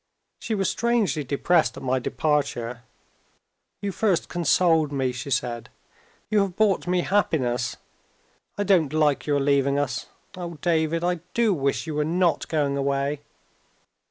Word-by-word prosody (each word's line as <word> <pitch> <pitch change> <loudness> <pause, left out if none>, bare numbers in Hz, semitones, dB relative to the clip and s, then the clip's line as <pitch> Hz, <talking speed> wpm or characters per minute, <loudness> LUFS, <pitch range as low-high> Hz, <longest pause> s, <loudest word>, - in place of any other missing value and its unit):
She 220 - -2
was 195 -2 0
strangely 225 -8 +1
depressed 155 +5 +1
at - - -8
my 130 0 +1
departure. 125 -5 -1 1.0
"You 200 - -1
first 195 -3 0
consoled 165 -2 +2
me," 135 -2 0
she 125 +3 -6
said; 120 -3 -2 0.6
"you 215 0 +2
have 195 -3 0
brought 205 -4 +2
me 180 0 +2
happiness. 135 -12 0 0.8
I 205 - 0
don't 175 -8 +3
like 150 -2 +1
your 145 -1 +2
leaving 140 0 +2
us. 135 -4 -2 0.3
Oh, 170 -2 -6
David, 165 0 +1
I 175 0 0 0.2
do 230 -3 +3
wish 140 -3 -1
you 160 - -4
were 150 0 0
not 170 +2 +1
going 145 -3 0
away!" 140 +1 -1
155 Hz, 145 wpm, -24 LUFS, 140-180 Hz, 1.0 s, don't